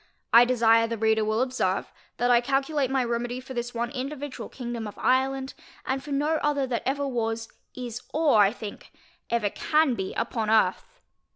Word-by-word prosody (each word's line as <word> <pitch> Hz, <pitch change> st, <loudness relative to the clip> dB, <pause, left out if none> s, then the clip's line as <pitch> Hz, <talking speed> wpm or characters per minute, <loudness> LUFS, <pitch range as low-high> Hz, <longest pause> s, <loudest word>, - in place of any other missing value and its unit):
I 235 Hz, +1 st, +9 dB
desire 230 Hz, -2 st, +4 dB
the 230 Hz, 0 st, -3 dB
reader 220 Hz, 0 st, +2 dB
will 215 Hz, +3 st, +1 dB
observe, 255 Hz, 0 st, -1 dB, 0.2 s
that 245 Hz, 0 st, +2 dB
I 240 Hz, -1 st, +5 dB
calculate 275 Hz, +2 st, 0 dB
my 265 Hz, -1 st, +1 dB
remedy 240 Hz, +1 st, -2 dB
for 260 Hz, +1 st, -9 dB
this 240 Hz, 0 st, -4 dB
one 235 Hz, +1 st, -2 dB
individual 275 Hz, +1 st, -5 dB
Kingdom 240 Hz, -3 st, -5 dB
of 205 Hz, -, -10 dB
Ireland, 265 Hz, +1 st, +1 dB, 0.3 s
and 265 Hz, 0 st, -2 dB
for 295 Hz, -, -10 dB
no 300 Hz, +3 st, +1 dB
other 285 Hz, -2 st, +1 dB
that 245 Hz, -2 st, -2 dB
ever 280 Hz, +1 st, 0 dB
was, 225 Hz, -3 st, -2 dB, 0.3 s
is, 245 Hz, -2 st, -6 dB
or, 300 Hz, -7 st, +3 dB
I 200 Hz, 0 st, +5 dB
think, 215 Hz, -3 st, -9 dB, 0.4 s
ever 220 Hz, -4 st, 0 dB
can 305 Hz, -3 st, +2 dB
be 190 Hz, -4 st, -4 dB
upon 220 Hz, -3 st, -2 dB
Earth. 215 Hz, -4 st, +2 dB
245 Hz, 180 wpm, -26 LUFS, 230-270 Hz, 0.4 s, I